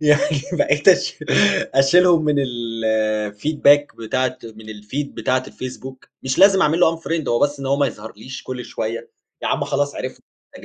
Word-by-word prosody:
يعني 150 -1 +2
بقيت - - +2
أشي - - +3 0.6
أشيلهم 165 +4 +4
من 150 -1 +2
الfeedback 115 +3 0
بتاعة 130 +3 -2
من 110 -1 -12
الfeed 110 +7 -5
بتاعة 130 0 0
الFacebook، 130 0 -9
مش 130 0 -2
لازم 195 0 +6
أعمل 160 +3 +1
له 165 -2 +3
unfriend 165 -2 -4
هو 120 - +1
بس 145 +1 0
إن 135 - -5
هو 135 +1 +1
ما 140 0 +2
يظهرليش 110 +1 -9
كل 125 -1 -6
شوية، 115 +1 -5 0.3
ياعم - - -1
خلاص 145 0 -1
عرفت 130 - -6
إن - - -39
أنت - - -13
130 Hz, 165 wpm, -20 LUFS, 115-145 Hz, 0.6 s, لازم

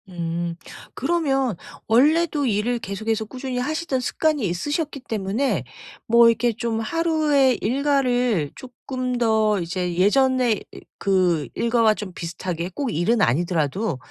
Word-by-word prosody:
음. 170 -1 -3 0.4
그러면 270 - 0 0.3
원래도 295 +5 +3
일을 235 +1 0
계속해서 220 +2 -3
꾸준히 255 +2 -5
하시던 300 +1 -1
습관이 295 0 0
있으셨기 290 - -3
때문에 215 - -1 0.4
뭐 235 +1 +6
이렇게 230 +1 +1
좀 230 0 -2
하루에 300 -1 +2
일과를 250 - +1
쪼끔 255 0 -5
더 220 -3 +2
이제 175 +1 -3
예전에 250 +5 +3
이 210 - -5 0.4
그 180 -5 +2
일과와 230 -2 +3
좀 200 -4 -7
비슷하게 175 0 -4
꼭 275 -6 -2
일은 205 +8 +1
아니더라도 165 - 0
230 Hz, 280 characters per minute, -23 LUFS, 190-265 Hz, 0.4 s, 뭐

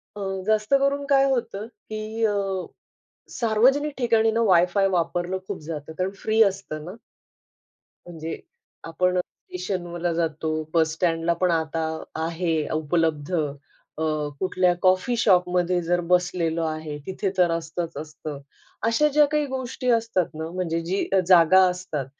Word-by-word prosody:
अ, 205 - -6 0.3
जास्त 215 +4 +1
करून 280 +1 +1
काय 275 -1 +4
होतं, 230 -5 -2
की 220 -1 -6
अ, 205 -2 +1 1.0
सार्वजनिक 255 +6 +2
ठिकाणी 225 -2 +3
न 225 - 0
वायफाय 185 +2 +4
वापरलं 175 0 -1
खूप 200 - -4
जातं 155 -1 -6
कारण 185 +1 0
फ्री 220 +1 +4
असतं 190 -7 -1
ना. 185 +6 -8 1.1
म्हणजे, 165 -2 -6 0.4
आपण 180 +2 0
स्टेशनला 175 -1 -4
जातो, 160 -1 -1 0.2
बसस्टँडला 165 +1 +1
पण 180 +1 +1
आता 160 -1 -1 0.4
आहे 165 0 -1 0.2
उपलब्ध, 155 0 0
अ, 145 0 -5 0.4
कुठल्या 185 -1 +2
कॉफी 185 +6 +3
शॉपमध्ये 180 -3 +2
जर 175 +1 +1
बसलेलो 175 -2 +1
आहे, 155 -2 -4
तिथे 190 +1 -2
तर 175 -2 +4
असतंच, 165 0 -4
असतं, 155 -1 -7 0.5
अशा 230 +7 +3
ज्या 300 0 +6
काही 300 -1 +1
गोष्टी 260 -1 -3
असतात 230 -6 +1
ना 160 +1 -5
म्हणजे 170 -2 -2
जी 190 +3 -1
अ, 195 - +5
जागा 180 +1 +7
असतात, 180 -6 -4
180 Hz, 130 wpm, -24 LUFS, 165-215 Hz, 1.1 s, जागा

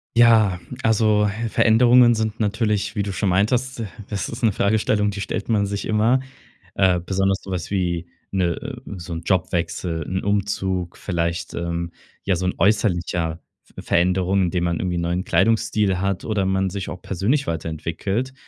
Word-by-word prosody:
Ja, 110 -6 +5 0.2
also 110 -2 +3 0.2
Veränderungen 120 +2 +5
sind 110 0 -2
natürlich, 105 -1 0
wie 100 - +1
du 100 - -4
schon 100 +1 0
meintest: 120 +8 +1
„D 110 - -3 0.2
das 100 -3 -3
ist 115 +2 -7
'ne 110 - +4
Fragestellung, 105 +1 +1
die 100 -1 -5
stellt 100 - -3
man 105 -3 +2
sich 100 0 -4
immer“. 110 +4 +3 0.6
Äh, 95 -2 +3
besonders 95 +2 0
so 95 - -11
was 90 0 -4
wie, 85 -3 -1 0.2
'ne 90 -3 +1
äh, 135 0 -6 0.2
so 85 0 -7
'n 80 - -4
Jobwechsel, 85 -2 -1
'n 95 +4 -2
Umzug, 95 -3 -1
vielleicht, 85 -1 -2
ähm, 85 0 -3 0.3
ja 95 -2 +2
so 90 - -2
'n 90 - 0
äußerlicher 85 -5 +1 0.2
V - - -12
Veränderung, 90 +2 +2
indem 90 0 0
man 85 -1 -1
irgendwie 90 -2 -1
'n - - -1
neuen 85 +2 -1
Kleidungsstil 105 -4 +2
hat 95 -1 -1
oder 105 -3 0
man 95 0 +1
sich 95 0 -5
auch 90 - -7
persönlich 105 - 0
weiterentwickelt, 85 - -3
95 Hz, 170 wpm, -22 LUFS, 90-110 Hz, 0.6 s, Ja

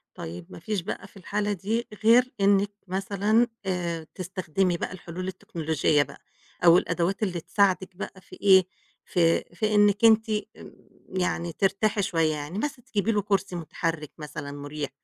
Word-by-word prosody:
طيب 85 +1 -7
ما 90 - -10
فيش 210 -3 -2
بقى 185 - -5
في - - -18
الحالة 205 +2 -2
دي 215 +5 -2 0.2
غير 245 +3 +6
إنِّك 200 +1 +4 0.2
مثلًا 200 +5 +2 0.2
آآ 170 -4 -2
تستخدمي 185 -1 -1
بقى - - -4
الحلول 180 +1 -6
التكنولوجية 160 -5 0
بقى - - -14 0.4
أو 170 0 +9
الأدوات 185 +4 0
اللي 180 -4 -1
تساعدِك 190 0 +1
بقى 185 0 -7
في - - -13
إيه، 190 -2 +6 0.4
في 165 -2 +2
في 215 +4 0
إنِّك 205 +1 +5
أنتِ 220 0 +5
آمم 215 0 -4 0.4
يعني 180 -2 -1
ترتاحي 200 +3 +1
شوية. 165 -4 +1
يعني 150 +5 -5
مثلًا 250 0 -3
تجيبي 225 -4 0
له 210 -2 +1
كُرسي 200 -2 0
مُتحرِّك 165 -2 -3
مثلًا 150 -1 -6
مُريح، 145 +1 -5
190 Hz, 155 wpm, -26 LUFS, 165-205 Hz, 0.4 s, أو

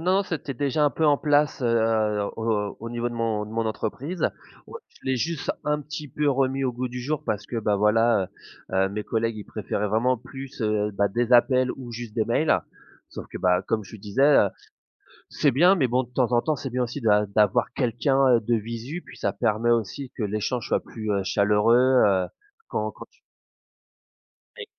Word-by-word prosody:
non, 185 +4 +2
c'était 145 -6 -4
déjà 145 +3 0
un 145 - +4
peu 155 +5 0
en 145 -1 +5
place, 145 -2 +1
heu, 110 -3 +2 0.2
au 110 -3 -1
au 115 - -6
niveau 120 0 -2
de 120 - -8
mon 110 -2 -1
de - - -11
mon 115 0 -1
entreprise. 125 - -4 0.4
Ouais, 475 - -9
je - - -26
l'ai 130 -1 0
juste 160 +3 -2
un 150 0 0
petit 150 0 -7
peu 150 +3 0
remis 135 0 +1
au 125 - 0
goût 125 +1 -3
du 125 +1 -6
jour 145 +4 -2
parce 105 0 -2
que 120 - -5
bah 105 -2 +1
voilà, 105 -1 +3 0.4
heu, - - -2
heu, - - -3
mes 105 +2 -5
collègues 115 0 -1
ils 105 - -7
préféraient 105 0 -3
vraiment 120 +5 +1
plus, 135 +2 -10
heu, 105 -1 0
bah, 100 +1 +1
des 120 +4 -1
appels 125 +1 +4
ou 120 -3 -9
juste 115 -2 -7
des 110 -2 +1
mails 155 +7 +2 0.5
sauf - - -8
que, - - -8
bah, 90 0 +3
comme 110 -1 0
je 110 - -11
disais, 105 +6 -2
heu, 140 -8 +6 0.8
c'est 145 - +2
bien, 175 +9 +5
mais 135 -9 +1
bon 125 +2 +1
de 120 - -20
temps 125 -2 +1
en 120 - +4
temps, 155 +4 0
c'est 135 - -5
bien 125 +1 -1
aussi 125 +4 -6
d'a 105 -3 +3
d'avoir 105 +4 +2
quelqu'un 130 +1 +2
de 115 +2 0
visu, 115 +9 -5
puis - - -13
ça - - -1
permet 115 0 0
aussi 120 +4 -1
que 115 - -4
l'échange 105 +4 -2
soit - - +2
plus, 110 -2 -6
heu, 100 -1 0
chaleureux, 105 +4 +3 0.3
heu, 95 -3 +2 0.4
quand - - -2
quand - - -11
tu - - -31 1.4
Oui. 470 - -7
120 Hz, 210 wpm, -25 LUFS, 105-135 Hz, 1.4 s, heu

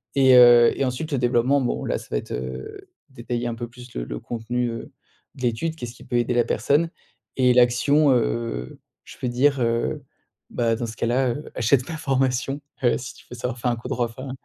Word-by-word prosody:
et, 130 -2 +6
heu, 120 -1 +8
et 135 - +2
ensuite 140 +5 -3
le 140 - +1
développement, 125 +3 +2
bon, 120 - -2
là, - - -1
ça - - -11
va - - +1
être, - - -7
heu, 65 +1 -6 0.2
détailler 120 -1 -4
un 115 - -3
peu 120 +1 -5
plus 125 +1 -14
le - - -4
le - - -6
contenu, 120 +1 -2
heu, 115 0 -7 0.4
de 130 - -12
l'étude, 125 +7 -1
qu'est-ce 120 -7 -7
qui - - -14
peut - - -4
aider 120 +1 +1
la 120 -1 +3
personne 150 +6 +1 0.5
et 125 -1 +4
l'action, 125 +5 +4
heu, 115 - -2 0.3
je - - -13
peux - - -3
dire, 135 +3 +2
heu, 115 0 0 0.5
bah 115 -1 0
dans 120 - -3
ce 115 - -8
cas-là, 125 +2 +1
heu, 145 +6 -5
achète 125 +2 +2
ma 160 - -4
formation, 135 -1 0 0.2
heu, 120 - +3
si 125 - -7
tu - - -18
veux 125 - -6
savoir 125 0 -3
faire 125 - 0
un - - 0
coup 120 +2 -8
droit 125 -3 0
enfin 130 +3 -8
125 Hz, 220 wpm, -23 LUFS, 120-130 Hz, 0.5 s, heu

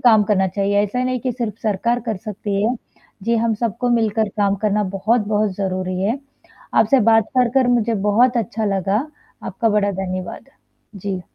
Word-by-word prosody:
काम 220 -4 +6
करना 190 -2 +3
चाहिए 200 +2 +1
ऐसा 250 +5 -1
नहीं 255 -1 -1
कि 255 -2 -2
सिर्फ 230 -3 -4
सरकार 235 +3 0
कर 220 -3 -1
सकती 200 0 -3
है। 240 +3 +1 0.5
जी 235 +2 +1
हम 230 0 +1
सबको 235 +2 -2
मिलकर 220 -2 +1
काम 200 -1 +2
करना 210 0 +2
बहुत-बहुत 215 0 +1
ज़रूरी 185 -1 -2
है। 225 +7 0 0.6
आपसे 270 -2 +4
बात 225 -1 +5
कर 250 -1 +4
कर 260 -2 +3
मुझे 235 -2 +2
बहुत 245 +4 +4
अच्छा 220 -1 -1
लगा, 200 - 0 0.4
आपका 230 - -1
बड़ा 205 -1 +2
धन्यवाद। 185 -1 -5 0.5
जी। 195 -1 -4
215 Hz, 170 wpm, -20 LUFS, 200-235 Hz, 0.6 s, काम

